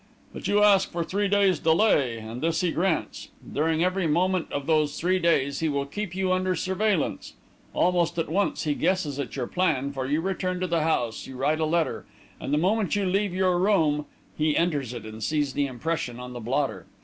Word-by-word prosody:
"But - - -5
you 205 0 +3
ask 200 -2 +5
for 170 0 -2
three 200 +4 -1
days' 195 -4 +3
delay, 160 - +3
and 115 +2 -7
this 165 +1 +1
he 180 -2 +1
grants. 170 -1 -1 0.3
During 160 +2 +1
every 185 -1 +1
moment 180 +3 +1
of 140 -1 -3
those 155 -2 +1
three 185 +2 +1
days, 140 -5 +1
he 160 - 0
will 140 -1 -1
keep 180 +5 -5
you 190 -1 0
under 185 0 0
surveillance. 190 0 -1 0.4
Almost 175 -1 +2
at 165 - 0
once, 195 +6 0
he 150 -3 +1
guesses 160 -4 0
at 140 - -4
your 130 -3 -2
plan, 145 -5 0
for 130 -1 -3
you 150 +3 +1
return 185 0 -2
to 185 - -1
the 170 -2 0
house, 120 -8 -1
you 130 - -9
write 150 +4 +1
a 160 - +1
letter, 165 +1 -1 0.3
and, - - -5
the 150 - +3
moment 200 +5 +1
you 205 -1 0
leave 195 +2 +1
your 185 -2 +2
room, 160 -7 +2 0.3
he 155 0 +1
enters 145 -8 0
it 120 -3 -7
and 110 0 -9
sees 145 +1 0
the 145 -1 0
impression 130 -1 -3
on 125 0 -8
the 120 - -6
blotter. 130 +4 -2
165 Hz, 210 wpm, -26 LUFS, 140-185 Hz, 0.4 s, ask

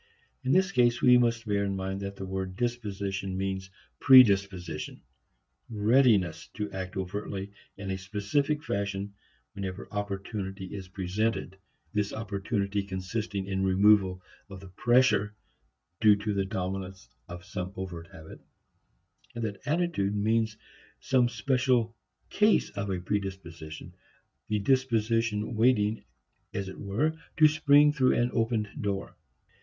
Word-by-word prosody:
In 130 - 0
this 190 +3 +3
case, 120 -6 +3
we 125 -1 +6
must 115 -1 +1
bear 100 -2 0
in 100 -1 -1
mind 95 +1 -3
that 100 0 -5
the 95 - -6
word 95 -1 -4
disposition 100 -5 -3
means 95 -1 -3 0.3
predisposition, 95 -10 +4 0.7
readiness 110 -6 +3
to 105 -1 -4
act 95 0 -5
overtly 95 +1 -4 0.3
in 100 -1 -5
a 95 - -3
specific 110 +10 -1
fashion 100 -4 -3 0.4
whenever 95 -1 -6
opportunity 100 -1 -4
is 95 -2 -7
presented, 95 +2 -2 0.4
this 105 -1 -1
opportunity 100 -1 -2
consisting 100 +1 -4
in 95 0 -2
removal 95 -1 +4 0.3
of 95 -1 -9
the 95 0 -12
pressure 120 0 +2 0.6
due 105 -1 +6
to 105 +1 -3
the 100 -1 0
dominance 95 - -5 0.2
of 85 +1 -9
some 90 0 -5
overt 90 -3 -6
habit; 80 -5 -13 0.9
and 115 - -4
that 105 -3 -4
attitude 155 - 0
means 110 +1 +1 0.4
some 125 -2 +2
special 125 0 +1 0.4
case 210 +1 +3
of 100 0 -4
a 95 -2 -1
predisposition, 90 -5 -5 0.5
the 105 - 0
disposition 115 -2 +1
waiting 110 -2 +2 0.5
as 100 -1 -3
it 95 - -10
were 125 +11 0 0.2
to 155 -1 +8
spring 150 -1 +5
through 130 -3 +3
an 120 +1 +1
opened 115 -2 0
door. 100 -2 -3
100 Hz, 130 wpm, -28 LUFS, 95-115 Hz, 0.9 s, to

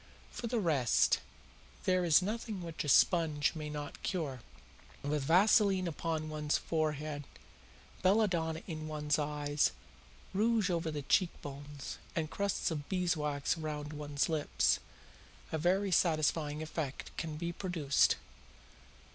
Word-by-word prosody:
For 235 - -4
the 240 +1 -1
rest, 150 - +3 0.7
there 185 -1 +3
is 170 +1 +5
nothing 215 -2 -3
which 165 -1 -4
a 145 - -2
sponge 155 -3 +4
may 155 -2 -5
not 150 -1 -6
cure. 145 -9 -2 0.6
With 145 +1 0
vaseline 190 +2 +4
upon 160 -1 -2
one's 150 -1 0
forehead, 155 -2 -2 0.8
belladonna 180 -5 +2
in 155 -3 -5
one's 150 -1 0
eyes, 145 - +1 0.6
rouge 215 -1 +2
over 165 -1 0
the 150 -2 -4
cheek 175 +5 +3
bones, 145 0 -7 0.2
and 160 -2 -1
crusts 200 -3 0
of 145 -3 -4
beeswax 155 -7 0
round 150 -1 -4
one's 145 -1 -1
lips, 155 -3 +2 0.7
a 160 - -1
very 190 +4 +2
satisfying 155 -2 +2
effect 155 -3 -5
can 155 -2 -4
be 170 +2 -3
produced. 165 -7 +2
155 Hz, 125 wpm, -33 LUFS, 150-180 Hz, 0.8 s, is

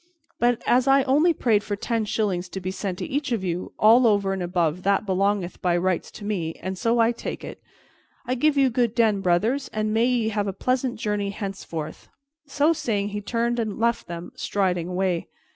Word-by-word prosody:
But 240 -1 +2
as 255 +2 +3
I 270 0 +5
only 295 +6 +4
prayed 225 -9 +1
for 210 -1 -3
ten 225 +2 -1
shillings 190 -4 -1
to 190 - -5
be 185 0 -4
sent 190 -1 -4
to - - -4
each 285 -2 -2
of 225 -5 0
you, 180 0 -3
all 230 +3 +6
over 200 -2 +2
and 190 - -3
above 175 -1 0
that 200 +2 +1
belongeth 195 -1 0
by 175 -1 +2
rights 185 -1 0
to 205 - -9
me, 175 -6 -2
and 190 0 -5
so 230 +4 +1
I 230 0 +4
take 235 - -6
it. - - -8 0.6
I 250 - -1
give 290 +3 +2
you 270 -2 +4
good 235 -1 +1
den, 220 -4 +3
brothers, 215 +10 +1
and 215 0 -1
may 225 +2 +3
ye 240 -3 +1
have 205 -1 -1
a 195 - -2
pleasant 255 +4 -1
journey 210 -3 -1
henceforth." 195 -6 -6 0.4
So 290 +4 +2
saying, 205 -9 -1
he 205 0 -4
turned 235 +3 -1
and 215 -3 -2
left 235 +1 0
them, 170 0 -7
striding 180 -4 -1
away. 180 -1 -1
210 Hz, 205 wpm, -24 LUFS, 185-240 Hz, 0.6 s, all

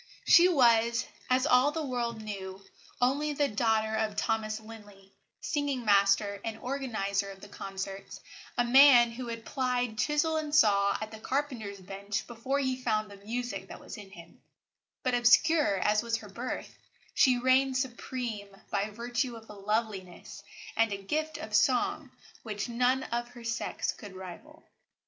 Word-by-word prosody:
She 350 +1 +7
was, 235 -5 +4 0.2
as 255 +1 +3
all 260 -1 +5
the 315 0 -3
world 235 -4 -3
knew, 195 -2 -7 0.3
only 285 +4 +1
the 285 0 +1
daughter 220 -1 +1
of 220 -1 -1
Thomas 220 -1 -1
Linley, 205 -3 -14 0.3
singing 280 -4 -2
master 200 0 +3
and 225 -1 -4
organiser 215 -7 -2
of 195 0 -10
the - - -11
concerts, 195 0 -7 0.4
a 245 - +4
man 245 -1 +7
who 245 +1 -7
had 230 -1 -6
plied 250 -4 -1
chisel 300 +5 +1
and 305 -1 -2
saw 200 -7 +4
at 215 +1 -6
the 220 - -9
carpenter's 235 -7 -3
bench 200 +2 -5
before 245 +4 -2
he 260 -2 -1
found 215 -3 -1
the 200 - -11
music 220 -3 -4
that - - -10
was - - -9
in 205 -3 -11
him; 170 -3 -14 0.6
but, 255 - 0
obscure 245 0 +4
as 210 +3 +2
was 230 -1 -1
her 215 -2 -11
birth, 240 +6 -6 0.3
she 255 -2 +4
reigned 260 +1 +3
supreme 240 -4 -4 0.2
by 200 +1 0
virtue 240 +3 -3
of 225 -1 -12
a - - -9
loveliness 200 -2 -4 0.3
and 225 -1 +2
a 200 - -2
gift 310 +10 -3
of 220 -8 -8
song 220 +3 +2 0.3
which 210 -2 -4
none 250 +2 +1
of 240 +1 -3
her 240 -1 -13
sex 230 0 -2
could 200 -3 -11
rival. 185 -2 -11
230 Hz, 160 wpm, -29 LUFS, 205-255 Hz, 0.6 s, She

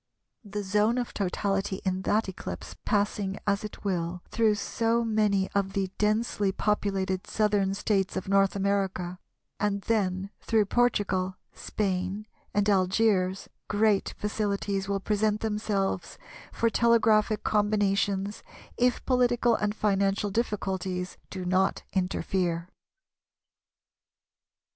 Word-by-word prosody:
The 205 -1 -5
zone 210 +4 +2
of 245 -1 -2
totality 195 0 -1
in 185 0 0
that 215 +1 +2
eclipse 190 - -7
passing 205 -2 0
as 200 0 +1
it 210 - -8
will 175 -2 -2
through 220 -2 +3
so 230 +3 0
many 210 -3 +2
of 195 -1 0
the 195 -2 -1
densely 210 -1 +1
populated 195 -2 -1
Southern 205 -2 +1
States 195 -2 0
of 190 - -4
North 195 0 +3
America, 190 -2 -1 0.4
and 200 0 0
then 195 -3 0
through 220 -2 +2
Portugal, 195 -5 +1 0.2
Spain, 195 0 -2 0.3
and 205 0 +1
Algiers, 190 -1 +2 0.2
great 210 -1 +2
facilities 200 -2 -2
will 200 0 0
present 210 +1 0
themselves 210 -3 -1 0.3
for 230 0 +1
telegraphic 220 -2 +3
combinations, 205 -1 +1 0.4
if 245 0 +1
political 245 -2 +3
and 210 -1 0
financial 200 -1 +1
difficulties 190 -4 -2
do 185 -2 -5
not 185 +1 +1
interfere. 180 -2 -1
200 Hz, 110 wpm, -28 LUFS, 190-215 Hz, 0.4 s, through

